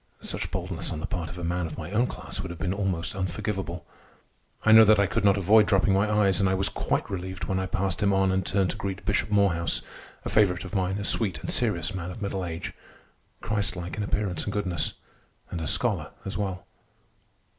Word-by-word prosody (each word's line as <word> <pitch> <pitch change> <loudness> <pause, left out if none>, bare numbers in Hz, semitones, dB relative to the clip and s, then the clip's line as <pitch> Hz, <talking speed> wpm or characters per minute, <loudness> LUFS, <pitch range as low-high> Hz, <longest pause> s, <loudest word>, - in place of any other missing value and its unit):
Such - - -2
boldness - - -3
on - - -3
the - - -3
part 85 -3 -3
of 90 - -9
a 90 - -6
man 90 0 -1
of 75 - -8
my 85 +2 -6
own 115 +4 +2
class - - -5
would - - -6
have 85 - -7
been 90 +3 -1
almost 95 -4 -2
unforgivable. 95 -2 -3 0.8
I 110 - +6
know 110 0 +10
that 110 -1 +6
I 100 - +5
could 105 +3 -1
not 100 0 +5
avoid 105 +2 +5
dropping 95 +1 +3
my 100 +2 +2
eyes, 105 -2 +3
and 95 -1 +3
I 95 - +2
was 95 +1 +2
quite - - -1
relieved 95 -2 -5
when 95 +2 -1
I 95 - -2
passed 95 -2 -1
him 100 -1 +3
on 95 -1 +3
and 95 0 +1
turned 95 0 +1
to - - -6
greet 100 -1 -4
Bishop 105 0 +1
Morehouse—a 95 -5 -1
favorite 95 -4 +3
of 95 - -9
mine, 95 -1 0
a 100 - -3
sweet 100 -3 +1
and - - -2
serious - - +1
man 90 -2 -4
of 90 - -8
middle 100 -2 -2
age, 85 -1 -5 0.7
Christ 105 -3 -1
like 90 0 -5
in 105 - -3
appearance 100 -2 -1
and 100 - -3
goodness, 95 -5 -1 0.6
and 85 - -3
a 80 - -3
scholar - - 0 0.2
as 95 - -4
well. 95 -2 -3
95 Hz, 220 wpm, -27 LUFS, 90-100 Hz, 0.8 s, know